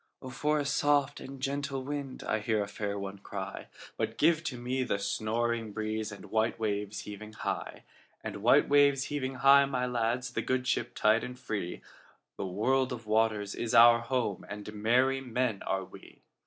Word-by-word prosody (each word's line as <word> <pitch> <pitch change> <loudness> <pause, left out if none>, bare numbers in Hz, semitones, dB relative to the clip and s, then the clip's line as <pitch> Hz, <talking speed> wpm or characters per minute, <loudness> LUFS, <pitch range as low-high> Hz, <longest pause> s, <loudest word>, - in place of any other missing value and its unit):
"O 130 - -8
for 150 +4 0
a 145 - -1
soft 145 0 +2
and 135 0 -9
gentle 140 0 -2
wind!"I 135 -5 -3
heard 105 0 0
a - - -6
fair 100 0 -4
one 100 0 -6
cry:But 100 0 -6
give 160 +1 +3
to 130 - -3
me 125 +2 -2
the 125 - 0
snoring 115 +2 -1
breezeAnd 110 -1 -4
white 110 +2 0
waves 105 -1 -2
heaving 105 +1 -9
high; - - -4 0.4
And - - -5
white - - +4
waves 140 -1 +4
heaving 135 -2 -2
high, 140 +1 +6
my 130 -2 -1
lads, 125 +1 -1
The - - -1
good 130 0 -1
ship 120 -2 -1
tight 110 +2 +3
and 125 0 -6
free—The 105 -4 -7
world 130 +8 +1
of 120 -2 -6
waters 110 -2 +1
is 120 0 -2
our 115 0 +8
home, 115 -4 -2
And 105 +1 -7
merry 125 +5 +2
men 125 -4 -1
are 95 -1 -1
we. - - -15
120 Hz, 170 wpm, -30 LUFS, 105-130 Hz, 0.4 s, our